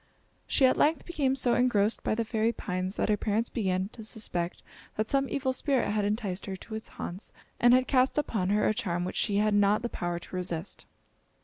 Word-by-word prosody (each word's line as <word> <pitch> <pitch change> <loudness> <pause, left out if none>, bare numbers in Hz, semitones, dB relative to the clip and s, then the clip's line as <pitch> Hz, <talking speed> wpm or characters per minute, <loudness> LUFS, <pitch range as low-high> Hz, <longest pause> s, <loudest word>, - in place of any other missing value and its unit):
She 270 - +4
at 255 - +4
length 310 +2 +2
became 285 -6 0
so 250 -2 +2
engrossed 225 -4 +2
by - - 0
the 230 0 -1
fairy 220 0 +1
pines 185 -3 -3
that - - 0
her 210 - +3
parents 220 +3 -1
began 190 -4 -1
to 225 - -11
suspect 195 -6 -3 0.3
that 215 +1 -2
some 275 -1 +1
evil 265 -2 -1
spirit 265 -4 0
had 210 -1 0
enticed 205 -3 -2
her 195 - -3
to 220 +4 -11
its 220 0 -5
haunts 180 +4 -6 0.3
and 240 - +6
had 255 +1 +4
cast 260 0 +2
upon 215 -10 0
her 210 +1 +2
a - - +2
charm 175 -4 -2
which 185 - -5
she 205 - 0
had 210 0 +2
not 205 +2 +3
the 240 - -1
power 175 -4 -3
to 175 - -9
resist. 180 -1 -4
215 Hz, 215 wpm, -29 LUFS, 190-245 Hz, 0.3 s, and